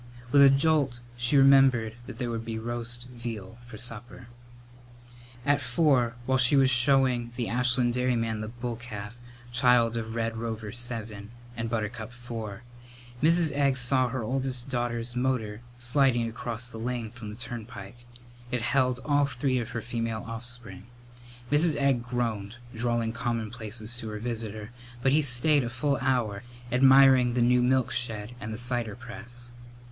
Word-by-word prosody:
With 140 - +6
a 140 - +9
jolt 135 -3 +2 0.2
she 120 +4 +3
remembered 135 -5 +5
that - - -8
there 120 -2 -3
would 115 -1 -3
be 115 -1 -5
roast 120 +1 -4
veal 115 -3 -7
for 120 -2 -11
supper. 120 +2 -2 1.2
At 145 0 +2
four, 125 -2 +2
while 130 0 +2
she 125 +3 +6
was 135 -1 +5
showing 125 -1 +3
the 120 -2 -2
Ashland 125 0 +1
dairyman 115 -3 0
the 110 - -4
bull 120 +1 -5
calf, 105 -3 -8 0.4
child 120 -1 +4
of 110 0 -5
Red 115 0 -1
Rover 110 -2 -5
VII 115 -4 -5 0.3
and 115 0 -3
Buttercup 110 0 -3
IV, 115 -4 -7 0.6
Mrs. 165 0 +3
Egg 140 -1 +1
saw 130 0 +2
her 130 -1 -3
oldest 130 +1 -2
daughter's 120 -1 -1
motor 120 -4 -1 0.2
sliding 120 -1 +2
across 115 +1 -5
the 115 -2 -8
lane 120 -1 -3
from 120 -3 -9
the 105 - -8
turnpike. 120 -2 -8 0.5
It 125 -2 -2
held 125 -1 +1
all 145 -1 +3
three 130 -1 -1
of 115 - -4
her 115 - -4
female 115 -2 -3
offspring. 115 -2 -6 0.6
Mrs. 155 +1 +3
Egg 140 -3 +2
groaned, 120 -3 -3 0.2
drawling 115 -1 -1
commonplaces 115 -1 -2
to 110 - -6
her 105 - -5
visitor, 110 -2 -5 0.3
but 135 - +3
he 150 +3 +4
stayed 145 +2 +4
a 120 - -3
full 140 +3 0
hour, 120 -6 0 0.3
admiring 130 -1 +6
the 125 - +2
new 125 +1 +4
milk 130 0 +2
shed 115 -2 -3
and 110 - -5
the 110 - -5
cider 120 -3 -2
press. 120 0 -10
120 Hz, 155 wpm, -27 LUFS, 115-130 Hz, 1.2 s, a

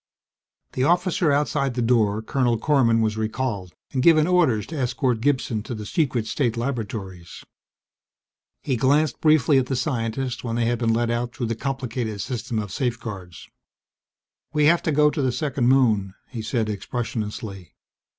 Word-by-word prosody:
The 130 - 0
officer 175 0 +2
outside 140 -2 0
the 125 - 0
door, 110 -3 +2
Colonel 120 -2 +1
Korman, 115 -4 +3
was 110 0 -1
recalled 110 -4 -3 0.2
and 130 - +1
given 155 +1 +5
orders 160 - +2
to 160 - -8
escort 125 -3 0
Gibson 130 -4 0
to 120 +3 -6
the 105 -1 -7
secret 125 - 0
state 115 +1 -1
laboratories. 105 -8 -5 1.2
He 130 -4 0
glanced 140 +3 +2
briefly 155 -3 +4
at 130 - -1
the 135 - -1
scientist 125 0 -2
when 115 -2 -3
they 120 -1 +1
had 120 0 0
been 115 -2 +1
let 115 +1 +1
out 120 +2 -2
through 130 -5 -2
the - - -6
complicated 125 -4 -3
system 120 +1 -3
of 105 -3 -3
safeguards. 105 - -4 1.1
"We 150 -1 +3
have 170 +3 +4
to 160 - -1
go 150 0 +4
to 150 - -2
the 130 -2 +1
second 135 -2 -1
moon," 110 -8 +3 0.2
he 120 -3 -5
said 110 0 -1
expressionlessly. 105 -3 -5
120 Hz, 160 wpm, -23 LUFS, 110-140 Hz, 1.2 s, given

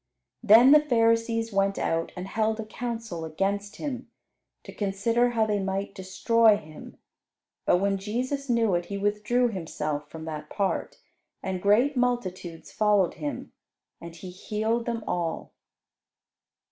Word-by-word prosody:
Then 235 +4 +7
the 300 - +9
Pharisees 230 -4 +1
went 195 0 +1
out 165 0 -1
and 180 - -4
held 220 +2 0
a 220 - -4
council 225 -6 -5
against 200 +6 -2
Him, 260 -4 -5 0.5
to - - -10
consider 225 +5 +1
how 230 -2 +1
they 210 -1 0
might 195 +1 -3
destroy 215 +4 +3
Him; 155 -3 -12 0.7
but - - +5
when 195 +1 0
Jesus 255 +7 -3
knew 230 -4 +2
it, 175 0 0
He 200 - -5
withdrew 210 +5 +1
Himself 150 -6 -4
from 160 -1 -8
that 150 -1 -6
part, 195 -2 -2 0.5
and 190 -2 -3
great 235 +9 +3
multitudes 190 -9 -2
followed 210 -4 +2
Him, 295 -1 -5 0.5
and 170 0 -9
He 180 +1 -9
healed 220 +5 -2
them 230 -2 -2
all. 170 -2 -3
210 Hz, 140 wpm, -26 LUFS, 185-230 Hz, 0.7 s, the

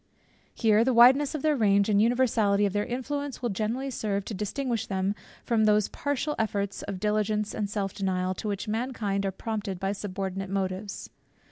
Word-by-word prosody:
Here 220 -1 +4
the 255 0 +1
wideness 265 +5 +6
of 295 - -4
their 305 -1 +3
range 200 -4 +3
and 205 -2 +3
the - - +5
universality 225 -4 +3
of 195 - -1
their 205 0 0
influence, 280 +3 -3
will 240 - 0
generally 230 +7 -2
serve 200 -4 -2
to - - -5
distinguish 225 +3 -2
them 190 0 0 0.3
from 225 -2 +2
those 210 -1 +3
partial 285 +1 -2
efforts 200 -2 -1
of 190 - -5
diligence 210 0 0
and 210 -2 -2
self 200 -2 -2
denial, 185 -2 -1
to 200 - -6
which 200 0 -3
mankind 215 -4 -1
are - - -1
prompted 200 -2 -4
by 195 +1 -1
subordinate 195 -1 -4
motives. 195 +1 -3
210 Hz, 180 wpm, -27 LUFS, 195-235 Hz, 0.3 s, wideness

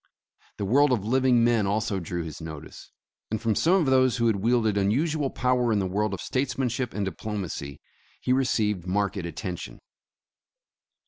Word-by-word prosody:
The 100 - -2
world 140 +7 +4
of 110 -5 0
living 125 0 +3
men 115 -4 +3
also 105 -1 0
drew 85 0 -4
his 80 0 -8
notice, 80 -1 -9 0.4
and 110 - -2
from 115 0 +1
some 170 - +3
of 185 -5 +3
those 130 -2 +3
who 115 - +1
had 110 -3 +2
wielded 110 0 +2
unusual 135 +9 +1
power 125 -2 +1
in 110 - +2
the 100 - 0
world 100 +2 -1
of - - -9
statesmanship 130 -2 -1
and 105 -1 -1
diplomacy, 95 -9 -5 0.4
he 125 - +1
received 105 -8 0
marked 100 +2 0
attention. 85 0 -5
110 Hz, 165 wpm, -26 LUFS, 95-125 Hz, 0.4 s, world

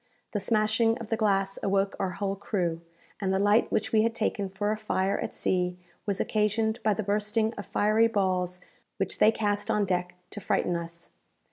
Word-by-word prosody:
The 210 - -1
smashing 220 +2 +2
of 230 -3 -8
the 225 - +1
glass 195 -3 +1
awoke 195 0 +1
our 190 - 0
whole 200 -1 -1
crew, 180 -5 -2 0.4
and 195 -2 0
the 190 - +2
light 205 +3 +3
which - - 0
we 220 - +4
had 230 +1 +1
taken 205 -3 -1
for 205 +2 -1
a - - +1
fire 200 -2 -1
at 225 - -4
sea 180 -1 0 0.3
was 200 -2 0
occasioned 220 +1 0
by 215 -2 +2
the 220 - -2
bursting 210 +2 0
of 205 -3 -8
fiery 215 +3 +3
balls 185 -4 0 0.4
which - - -2
they 215 - +6
cast 205 -2 -1
on 210 -1 +2
deck 180 -1 -1 0.2
to 210 - -5
frighten 175 -1 0
us. 170 0 -6
205 Hz, 195 wpm, -28 LUFS, 190-215 Hz, 0.4 s, they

